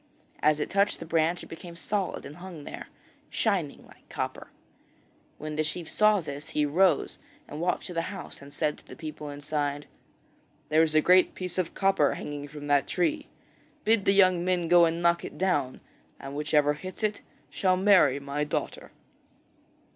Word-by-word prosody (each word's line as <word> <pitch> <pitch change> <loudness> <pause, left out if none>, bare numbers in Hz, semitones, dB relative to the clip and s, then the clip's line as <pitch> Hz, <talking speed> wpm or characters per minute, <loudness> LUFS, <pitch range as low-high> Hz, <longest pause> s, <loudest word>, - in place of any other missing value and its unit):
As 150 0 +3
it 150 - -3
touched 200 +1 +2
the 165 - -7
branch 165 +1 +1
it - - -10
became 170 +1 -10
solid 195 +2 -3
and 145 - -10
hung 175 -4 -9
there, - - -8 0.4
shining 185 -10 -1
like - - -20
copper. - - -4 0.9
When 155 0 -6
the 155 - +2
chief 160 +2 -4
saw 215 +1 +3
this 145 -1 -7
he 150 - +3
arose 180 +6 +2 0.3
and 150 - -7
walked 180 +1 0
to 180 - -6
the 165 - 0
house 195 -6 -8
and 140 0 -12
said 150 +1 -1
to - - -24
the - - -10
people 155 -2 -7
inside: 145 0 -3 0.8
'There 155 +1 +4
is 155 -1 +1
a 155 - +6
great 180 +3 +4
piece 185 0 -4
of 175 -2 -2
copper 195 -7 +2
hanging 145 -1 -6
from 145 0 -9
that 145 -1 +2
tree. 295 - 0 0.6
Bid 220 -2 +3
the 195 - +4
young 185 -3 +4
men 180 -2 0
go 175 0 +7
and 165 +1 -1
knock 170 0 +3
it - - -8
down 150 -9 0 0.4
and 135 +1 -8
whichever 150 0 +2
hits 185 +8 -9
it 215 -1 0 0.3
shall 185 -1 +2
marry 185 -9 +5
my 140 +1 -3
daughter.' 150 - -4
165 Hz, 180 wpm, -28 LUFS, 150-185 Hz, 0.9 s, go